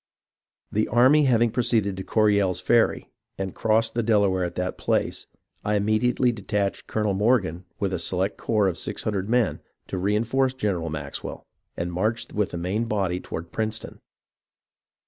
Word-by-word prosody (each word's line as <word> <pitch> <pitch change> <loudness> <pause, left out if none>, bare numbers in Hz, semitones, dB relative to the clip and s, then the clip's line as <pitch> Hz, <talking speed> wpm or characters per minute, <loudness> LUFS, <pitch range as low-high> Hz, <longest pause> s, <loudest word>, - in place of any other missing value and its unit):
The 110 +1 +1
army 135 +5 +5
having 120 -3 +3
proceeded 110 -5 +1
to 95 - -5
Coryell's 100 -4 +2
Ferry, 115 +4 +2 0.3
and 95 -1 -3
crossed 110 +1 +1
the 120 - 0
Delaware 100 -5 +2
at 90 -1 -3
that 90 0 -2
place, - - -1 0.4
I 105 0 +1
immediately 110 +4 +2
detached 100 -2 -2
Colonel 105 -2 0
Morgan 95 -5 +1
with 95 -1 -1
a 90 - -1
select 90 +3 -1
corps 105 -3 +1
of 90 - -2
six - - -4
hundred 100 -1 -2
men, 120 -3 +1 0.3
to 95 - -3
reinforce 115 +7 +1
General 95 -9 -1
Maxwell, 70 -3 -6 0.3
and 85 0 -3
marched 110 +6 -1
with 105 -2 0
the - - -5
main 95 +7 -1
body 95 -5 -1
toward 85 0 -7
Princeton. 110 0 -4
105 Hz, 155 wpm, -25 LUFS, 95-115 Hz, 0.4 s, army